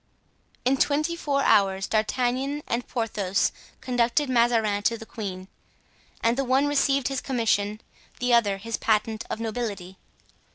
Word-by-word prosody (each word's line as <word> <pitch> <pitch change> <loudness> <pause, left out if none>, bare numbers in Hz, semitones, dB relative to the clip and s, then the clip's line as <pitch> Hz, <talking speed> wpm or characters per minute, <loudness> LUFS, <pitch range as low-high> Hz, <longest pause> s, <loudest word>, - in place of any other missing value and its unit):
In 265 +2 +3
twenty 305 +5 +1
four 280 -4 0
hours 195 -1 +3
D'Artagnan 255 +6 0
and 235 +1 -2
Porthos 210 -5 0 0.3
conducted 250 +3 +1
Mazarin 230 -4 +2
to 230 +3 +1
the 225 - -10
queen; 190 -5 -6 0.8
and 230 +1 +3
the - - +2
one 265 +2 +2
received 275 -2 +2
his 270 -1 -2
commission, 215 -5 0 0.4
the 250 0 +1
other 205 -4 +3
his 225 +3 -4
patent 220 0 0
of - - -3
nobility. 210 -5 -4
235 Hz, 135 wpm, -25 LUFS, 210-260 Hz, 0.8 s, In